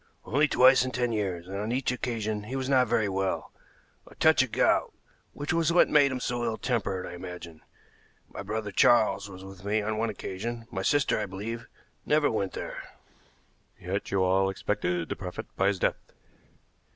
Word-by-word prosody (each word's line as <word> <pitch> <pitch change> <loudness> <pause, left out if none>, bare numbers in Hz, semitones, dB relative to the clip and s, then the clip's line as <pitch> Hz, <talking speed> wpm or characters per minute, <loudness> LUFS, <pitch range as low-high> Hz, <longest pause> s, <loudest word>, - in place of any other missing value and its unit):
"Only 150 +3 +3
twice 130 -1 +6
in 130 - -2
ten 125 -1 -1
years, 95 -6 -2
and 95 +1 -5
on 105 +3 -2
each 125 0 0
occasion 110 -4 -3
he 125 +5 -5
was 130 -1 -2
not 130 -2 +4
very 110 -2 +2
well 95 0 -2 0.6
a - - -15
touch - - +5
of - - -1
gout, - - +2 0.4
which 145 +2 -3
was 165 -1 +2
what 175 - +5
made 145 -2 +5
him 130 - -3
so 120 -1 -2
ill 115 -1 -1
tempered, 105 -7 -1
I - - -7
imagine. 85 -2 -9 0.7
My - - -8
brother 105 +1 -4
Charles 105 -1 +4
was 95 -1 -10
with 95 -1 -11
me 105 +2 +1
on 110 +1 -2
one 115 0 0
occasion; 115 +5 -5
my 95 - -3
sister, 145 +6 +2
I 105 - -2
believe, 110 +5 -6 0.4
never 150 -1 +2
went 100 -4 -2
there." - - -5 1.0
"Yet - - -3
you 95 -1 +1
all 95 +1 +3
expected 90 -4 -1
to - - -3
profit 90 -2 -6
by 95 - +2
his 100 -1 +1
death?" - - +1
110 Hz, 190 wpm, -28 LUFS, 95-125 Hz, 1.0 s, twice